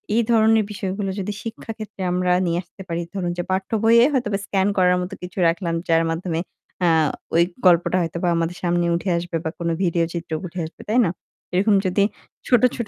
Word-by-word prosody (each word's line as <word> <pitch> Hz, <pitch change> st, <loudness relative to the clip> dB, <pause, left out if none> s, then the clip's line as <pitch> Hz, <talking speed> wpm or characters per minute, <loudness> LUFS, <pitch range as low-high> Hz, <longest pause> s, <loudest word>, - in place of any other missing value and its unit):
এই 235 Hz, -, +4 dB
ধরনের 220 Hz, -1 st, +4 dB
বিষয়গুলো 195 Hz, 0 st, -3 dB
যদি 200 Hz, +2 st, -3 dB
শিক্ষা 225 Hz, 0 st, -6 dB
ক্ষেত্রে 215 Hz, -3 st, -8 dB
আমরা 180 Hz, 0 st, +1 dB
নিয়ে 170 Hz, 0 st, 0 dB
আসতে 175 Hz, +3 st, -15 dB
পারি, 170 Hz, 0 st, -2 dB
ধরুন 175 Hz, -2 st, -1 dB
যে 175 Hz, -, -1 dB
পাঠ্যবইয়ে 225 Hz, +5 st, +3 dB
হয়তোবা 210 Hz, -6 st, 0 dB
স্কেন 195 Hz, 0 st, +1 dB
করার 180 Hz, -1 st, +4 dB
মত 180 Hz, -, -5 dB
কিছু 180 Hz, +2 st, -9 dB
রাখলাম 170 Hz, 0 st, 0 dB
যার 165 Hz, 0 st, +3 dB
মাধ্যমে 165 Hz, 0 st, -2 dB, 0.5 s
আ -, -, +4 dB, 0.5 s
ওই 170 Hz, -, +6 dB, 0.2 s
গল্পটা 175 Hz, +1 st, +4 dB
হয়তোবা 170 Hz, +1 st, -2 dB
আমাদের 165 Hz, +1 st, -1 dB
সামনে 175 Hz, 0 st, +1 dB
উঠে 185 Hz, +2 st, -2 dB
আসবে 170 Hz, -1 st, -3 dB
বা 160 Hz, -, -1 dB
কোনো 170 Hz, -1 st, -1 dB
ভিডিও 170 Hz, -1 st, +2 dB
চিত্র 170 Hz, -1 st, -6 dB
উঠে 180 Hz, +1 st, -6 dB
আসবে। 160 Hz, -, -11 dB
তাই 230 Hz, +4 st, +3 dB
না? 170 Hz, -, +1 dB, 0.4 s
এরকম 200 Hz, +3 st, +3 dB
যদি 185 Hz, +2 st, +2 dB, 0.4 s
ছোট, 245 Hz, -3 st, +4 dB
ছোট 235 Hz, -4 st, -4 dB
180 Hz, 190 wpm, -22 LUFS, 170-205 Hz, 0.5 s, ওই